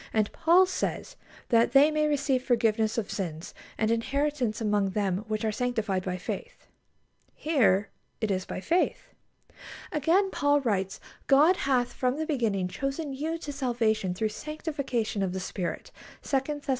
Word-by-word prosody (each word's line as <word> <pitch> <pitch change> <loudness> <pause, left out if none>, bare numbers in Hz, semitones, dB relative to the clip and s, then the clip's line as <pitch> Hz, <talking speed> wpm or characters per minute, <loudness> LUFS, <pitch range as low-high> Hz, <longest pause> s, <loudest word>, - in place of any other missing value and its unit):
And 215 -2 +1
Paul 345 +3 +5
says: 375 +6 -3 0.3
"That 230 0 +3
they 285 +3 +7
may 305 0 +1
receive 280 -3 +1
forgiveness 225 -3 +1
of 220 -4 -2
sins, 170 -4 -5 0.2
and 220 0 +1
inheritance 260 0 0
among 210 -3 +1
them 190 -2 0
which 215 0 -2
are 220 - +1
sanctified 220 -5 -1
by 185 -1 -3
faith." 480 - -6 0.7
Here 215 - +2 0.3
it 220 -2 -1
is 185 -1 0
by 185 - -6
faith. 345 - 0 0.8
Again, 345 +7 +2
Paul 290 0 +2
writes: 195 -6 -1 0.3
"God 300 +7 +6
hath 255 -6 0
from 255 +1 0
the 315 - -2
beginning 225 - 0
chosen 275 - -3
you 315 +5 -2
to 295 -3 -6
salvation 230 -8 0
through 215 +3 0
sanctification 280 -6 -3
of 190 -2 -1
the 190 - -3
Spirit" 185 -1 -4 0.3
(2 275 - +2 0.2
Thess. 285 - -14
245 Hz, 155 wpm, -28 LUFS, 210-290 Hz, 0.8 s, they